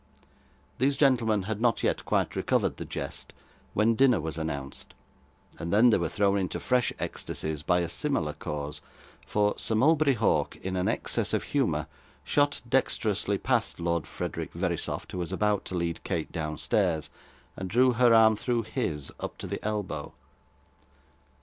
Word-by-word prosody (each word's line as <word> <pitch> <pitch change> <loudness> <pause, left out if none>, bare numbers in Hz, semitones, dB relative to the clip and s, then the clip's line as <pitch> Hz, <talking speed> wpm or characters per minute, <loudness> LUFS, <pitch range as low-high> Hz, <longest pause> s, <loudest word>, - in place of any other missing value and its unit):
These 135 +2 +2
gentlemen 115 -7 +3
had 110 +2 -4
not 120 -2 +2
yet - - 0
quite - - 0
recovered - - +1
the - - -5
jest, - - -6 0.4
when 110 +2 +4
dinner 125 -3 +4
was 80 -1 -3
announced, 70 -4 -5 0.6
and 85 +1 -4
then 115 +4 +6
they 105 - +3
were 85 -2 -1
thrown 100 -1 +2
into 95 -2 -2
fresh 125 -2 +1
ecstasies 80 -1 -3
by 90 +2 +2
a 85 - -1
similar 85 - -1
cause; 75 0 -5 0.5
for 105 0 +2
Sir 110 - 0
Mulberry 145 +3 +4
Hawk, 110 -2 +1
in 95 0 -5
an 90 - 0
excess - - 0
of - - -1
humour, - - 0 0.4
shot 145 0 +1
dexterously 110 -5 +1
past 120 -2 0
Lord 85 -1 -1
Frederick - - -5
Verisopht - - -3
who 90 - -4
was 85 0 -3
about 105 +1 +1
to 95 - -5
lead 85 -1 -2
Kate 85 -5 -3
downstairs, 80 +2 -1 0.4
and 95 0 -5
drew 125 +5 +4
her 120 0 +4
arm 110 -1 +6
through 120 +2 -1
his 80 - -3
up - - -5
to - - -7
the - - -5
elbow. 105 -8 -3
105 Hz, 160 wpm, -28 LUFS, 85-120 Hz, 0.6 s, then